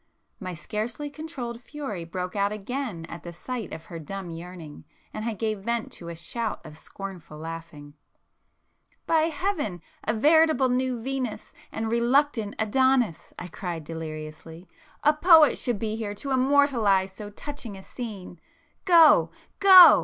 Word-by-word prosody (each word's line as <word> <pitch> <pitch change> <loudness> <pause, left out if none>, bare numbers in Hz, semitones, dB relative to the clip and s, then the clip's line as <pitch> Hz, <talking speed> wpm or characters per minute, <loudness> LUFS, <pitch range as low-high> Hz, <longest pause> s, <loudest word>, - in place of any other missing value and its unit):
My 185 -3 -5
scarcely 225 - -4
controlled 270 -7 -6
fury 250 - -6
broke 180 +2 -5
out 200 0 +1
again 210 -4 -4
at 170 +1 -9
the 170 - -8
sight 225 +3 -6
of 160 +1 -8
her 165 -1 -8
dumb 180 +3 -6
yearning, 165 -2 -9 0.3
and 215 - -4
I 230 - -1
gave 215 0 -2
vent 235 +3 -2
to 170 - -9
a 170 - -6
shout 215 +7 -3
of 155 -1 -10
scornful 175 -2 -9
laughter. 165 0 -7
[p - - -26 1.1
375]"By 325 -1 +4
heaven, 300 - -2 0.2
a 215 - 0
veritable 305 +1 +4
new 250 -1 0
Venus 260 -4 -4 0.2
and 220 0 -3
reluctant 235 -2 +2
Adonis!" 245 -3 +1
I 180 - -6
cried 170 -2 -5
deliriously—"A 160 - -4
poet 320 -1 +6
should 240 -4 0
be 215 +1 -2
here 210 -2 -4
to 275 +7 -5
immortalize 255 -8 +3
so 205 +1 -8
touching 235 -2 -8
a 190 - -11
scene! 200 -9 -8 0.5
Go—go!" 355 +1 +7
215 Hz, 145 wpm, -26 LUFS, 175-270 Hz, 1.1 s, Go—go